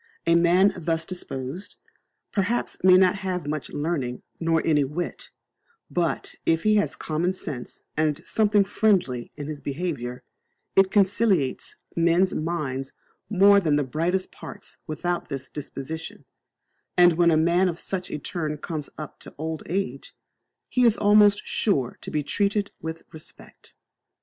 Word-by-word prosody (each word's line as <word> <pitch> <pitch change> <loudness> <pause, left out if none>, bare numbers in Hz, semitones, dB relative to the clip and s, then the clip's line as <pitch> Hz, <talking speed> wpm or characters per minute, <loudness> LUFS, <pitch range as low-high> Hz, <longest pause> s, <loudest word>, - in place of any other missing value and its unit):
A 170 - +4
man 175 +4 +5
thus 165 -1 -1
disposed, 170 -1 -6 0.6
perhaps 210 +4 0
may 185 -1 +8
not 185 0 +4
have 185 -5 -3
much 150 -1 -3
learning, 145 -5 -2 0.2
nor 165 -1 +2
any 150 -3 +3
wit; 150 +6 -4 0.6
but 170 -2 -1
if 165 0 +1
he 215 0 +4
has 205 - +1
common 165 +4 -1
sense 145 -9 -7
and 155 -1 +1
something 210 -2 +3
friendly 185 - +1
in 145 - -6
his 150 -1 -6
behaviour, 140 -5 -4 0.5
it 195 0 +5
conciliates 195 - +1 0.2
men's 170 +3 +3
minds 145 -5 -3 0.4
more 200 0 +6
than 155 -6 +2
the 145 - +2
brightest 170 +8 -1
parts - - -9
without 175 +3 -2
this 135 -3 -5
disposition; 155 +2 -7 0.7
and 175 -1 +7
when 170 +1 +4
a 160 - +4
man 170 +3 +3
of 170 0 -5
such 185 -2 -4
a - - -3
turn 150 0 -3
comes 150 0 -5
up 155 -2 -8
to - - -11
old 160 +1 -4
age, 170 -8 -3 0.5
he 250 - +1
is 230 -2 +5
almost 205 0 +5
sure 135 - 0
to - - -6
be 150 - -1
treated 200 +5 0
with 160 +1 -5
respect. 155 -1 -13
170 Hz, 145 wpm, -25 LUFS, 150-190 Hz, 0.7 s, may